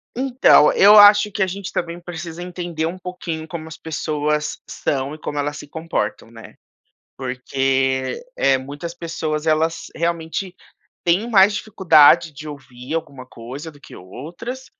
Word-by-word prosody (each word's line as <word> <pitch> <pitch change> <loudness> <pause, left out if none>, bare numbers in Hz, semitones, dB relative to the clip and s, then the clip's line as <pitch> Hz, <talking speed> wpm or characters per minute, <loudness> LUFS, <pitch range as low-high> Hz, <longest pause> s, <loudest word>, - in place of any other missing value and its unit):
Então, 255 - +5
eu 205 +2 +7
acho 205 0 +7
que 200 - -4
a 190 - +3
gente 195 0 -6
também 170 0 -3
precisa 175 -1 -8
entender 175 -3 -4
um 180 +3 -4
pouquinho 170 -3 -6
como 160 -1 -7
as 160 - -10
pessoas 150 -1 -2
são 140 +2 -2
e - - -12
como 145 -1 -4
elas 145 0 -2
se - - -10
comportam, 160 -9 -4
né? 115 -1 -13 0.6
Porque, 130 - -1
eh, 135 -1 +2
muitas 145 +6 -7
pessoas 160 -2 -4
elas 160 +1 0
realmente 170 +2 -3 0.5
têm 180 +7 +1
mais 205 -2 +5
dificuldade 170 -5 +4
de 150 +2 -10
ouvir 135 -1 -9
alguma 140 -6 -5
coisa 130 +7 -9
do 145 - -19
que - - -13
outras, 180 - -8
160 Hz, 150 wpm, -20 LUFS, 145-175 Hz, 0.6 s, eu